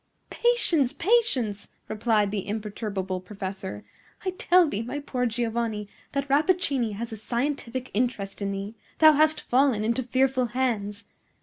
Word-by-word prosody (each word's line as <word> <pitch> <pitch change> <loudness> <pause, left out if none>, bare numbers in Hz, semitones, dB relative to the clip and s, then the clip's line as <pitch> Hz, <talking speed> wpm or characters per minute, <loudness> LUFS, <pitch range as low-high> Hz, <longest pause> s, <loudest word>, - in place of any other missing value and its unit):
"Patience! 350 - +3
patience!" 280 - +1 0.2
replied 215 -2 +1
the 200 -2 -3
imperturbable 205 -3 -3
professor. 190 +1 -6 0.4
"I 370 - +1
tell 360 -1 +4
thee, 220 -7 -2
my 250 +5 -4
poor 250 -3 -1
Giovanni, 225 -2 -2 0.3
that 280 0 -1
Rappaccini 280 - +2
has 230 +3 -5
a - - -6
scientific 255 +2 -3
interest 210 -4 -2
in 200 0 -1
thee. 200 +2 -5 0.2
Thou 315 -1 +8
hast 310 +1 +3
fallen 255 -4 +2
into 235 +4 0
fearful 255 +1 +1
hands! 215 -5 -1
235 Hz, 135 wpm, -26 LUFS, 210-280 Hz, 0.4 s, Thou